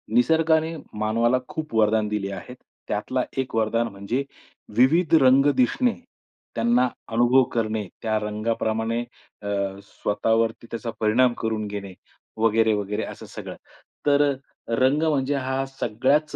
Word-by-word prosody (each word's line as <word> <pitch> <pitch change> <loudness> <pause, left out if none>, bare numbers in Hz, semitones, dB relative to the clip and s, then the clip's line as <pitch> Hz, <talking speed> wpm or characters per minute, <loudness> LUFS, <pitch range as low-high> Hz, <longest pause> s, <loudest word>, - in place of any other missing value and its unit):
निसर्गाने 160 +5 +3 0.2
मानवाला 115 +3 +2
खूप 155 -5 -5
वरदान 110 -1 +3
दिली 105 -2 -2
आहेत. 125 +5 -8 0.3
त्यातला 125 +5 -1
एक 130 -1 -2
वरदान 115 +1 +1
म्हणजे 100 +6 -3 0.5
विविध 160 +7 +4
रंग 135 +1 +6
दिसणे. 250 -1 +2 0.6
त्यांना 120 +2 +3 0.3
अनुभव 120 +3 +5
करणे, 110 -3 -1
त्या 110 -1 0
रंगाप्रमाणे 110 +1 -1 0.4
अ, 100 - -7 0.4
स्वतःवरती 115 +2 0
त्याचा 115 0 -4
परिणाम 120 +3 +3
करून 110 -2 -1
घेणे, 100 -2 -6 0.4
वगैरे-वगैरे, 110 -2 +1
असं - - -8
सगळं. - - -8 0.5
तर 145 0 +4 0.6
रंग 140 +4 +3
म्हणजे 145 -3 +1
हा 130 0 -1
सगळ्याच 135 +7 +1
115 Hz, 115 wpm, -24 LUFS, 110-135 Hz, 0.6 s, रंग